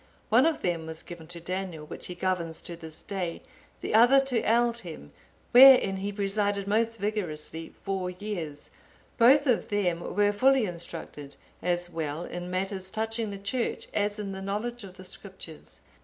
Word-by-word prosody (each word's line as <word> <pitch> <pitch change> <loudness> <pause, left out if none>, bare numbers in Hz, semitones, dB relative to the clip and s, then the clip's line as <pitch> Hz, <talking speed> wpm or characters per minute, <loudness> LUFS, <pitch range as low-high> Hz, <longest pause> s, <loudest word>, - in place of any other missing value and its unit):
(872) - - +3
One 305 +6 +5
of - - -16 0.2
them 160 - -9
was 160 0 -6
given 170 -2 -10
to 170 0 -5
Daniel,(873) 180 -3 -5
which - - -6
he 180 - -6
governs 175 -3 -1
to 170 - -7
this 160 -2 -8
day; 185 -4 -4 0.4
the - - -3
other 245 +5 +7
to 265 -4 0
Aldhelm, 230 - 0 0.4
wherein 250 -6 +8
he 200 +2 -3
presided 200 0 0
most 225 +2 +1
vigorously 165 -6 -3
four 190 -2 -2
years; 180 -6 -6 0.5
both 270 +5 +7
of 250 -4 +1
them 185 -5 +1
were 205 +4 +1
fully 260 +2 +4
instructed, 165 -5 -8 0.3
as 175 0 0
well 160 0 -3
in 175 0 -6
matters 190 +1 -3
touching 220 +1 -2
the 200 - -5
Church 205 +5 -2
as 205 0 +1
in 205 -2 -4
the 190 0 -6
knowledge 215 +4 -3
of 190 -1 -11
the 185 - -10
Scriptures. 185 -5 -9
195 Hz, 170 wpm, -28 LUFS, 175-220 Hz, 0.5 s, wherein